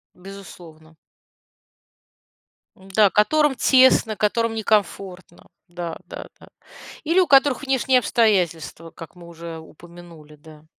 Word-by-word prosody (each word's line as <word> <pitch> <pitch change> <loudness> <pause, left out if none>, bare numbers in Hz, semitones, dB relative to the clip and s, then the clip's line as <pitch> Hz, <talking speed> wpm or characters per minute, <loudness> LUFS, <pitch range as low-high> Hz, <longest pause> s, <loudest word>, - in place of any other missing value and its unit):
Безусловно. 175 -4 -14 1.8
Да, 195 +2 +1
которым 295 +7 +1
тесно, 255 -4 +3
которым 225 +2 -1
некомфортно, 195 -4 -3 0.2
да-да-да, 175 -1 -10 0.6
или 330 +4 +1
у 370 - +3
которых 275 0 +3
внешние 265 -1 +1
обстоятельства, 170 - -1
как 165 +2 -13
мы 175 -1 -15
уже 170 -1 -10
упомянули, 165 -1 -16
да. 155 +1 -18
190 Hz, 95 wpm, -21 LUFS, 165-230 Hz, 1.8 s, тесно